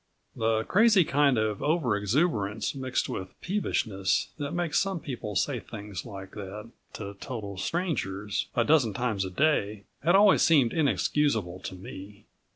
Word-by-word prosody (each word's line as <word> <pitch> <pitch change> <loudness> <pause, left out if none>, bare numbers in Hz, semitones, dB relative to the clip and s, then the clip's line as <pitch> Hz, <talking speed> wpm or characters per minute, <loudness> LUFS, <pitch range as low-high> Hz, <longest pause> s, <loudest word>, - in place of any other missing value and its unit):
The 110 -1 +1
crazy 205 - +5
kind 140 -3 +3
of 110 -2 0
over 145 -8 +1
exuberance 105 - 0
mixed 130 -2 -2
with 95 -1 -6
peevishness 105 - 0
that 145 -1 -3
makes 175 -3 0
some 195 -3 -1
people 115 -8 -6
say 125 +6 0
things 105 -1 -8
like 95 -3 -9
that 105 +2 -8 0.2
to 100 -1 -6
total 105 -7 -6
strangers 105 - -2
a 120 - +3
dozen 125 -7 +3
times 110 -5 -1
a - - -4
day 105 -4 +1 0.2
had 175 +3 +4
always 200 0 +6
seemed 140 -8 +4
inexcusable 140 - +1
to 95 - -7
me. 100 +2 -10
115 Hz, 150 wpm, -28 LUFS, 100-150 Hz, 0.2 s, always